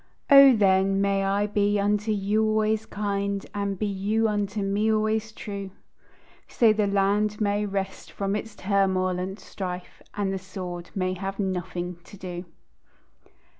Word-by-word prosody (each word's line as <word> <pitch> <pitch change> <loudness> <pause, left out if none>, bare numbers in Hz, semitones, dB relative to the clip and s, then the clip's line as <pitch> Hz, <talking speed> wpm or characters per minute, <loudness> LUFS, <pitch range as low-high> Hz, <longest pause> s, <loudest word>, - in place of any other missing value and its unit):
O, 275 -2 +9
then, 195 -1 +3
may 195 0 +1
I 200 +1 +1
be 205 0 +1
unto 210 +2 +1
you 210 +1 +1
always 215 0 +1
kind, 200 -1 -2
And 200 -1 -2
be 215 - -1
you 205 +3 0
unto 205 -1 -1
me 205 +3 +1
always 215 0 0
true; 200 -2 -6 0.8
So 225 -3 +4
the 210 -1 +1
land 205 +1 +1
may 205 0 +1
rest 195 -1 -4
from 200 0 -2
its 215 0 -5
turmoil 190 -2 +1
and 190 +2 -4
strife, 185 -2 -7
And 200 -2 -1
the 190 - -3
sword 180 -2 -7
may 185 -1 0
have 195 +1 -5
nothing 180 -2 -3
to 200 - -13
do. 180 -1 -6
200 Hz, 150 wpm, -26 LUFS, 190-210 Hz, 0.8 s, O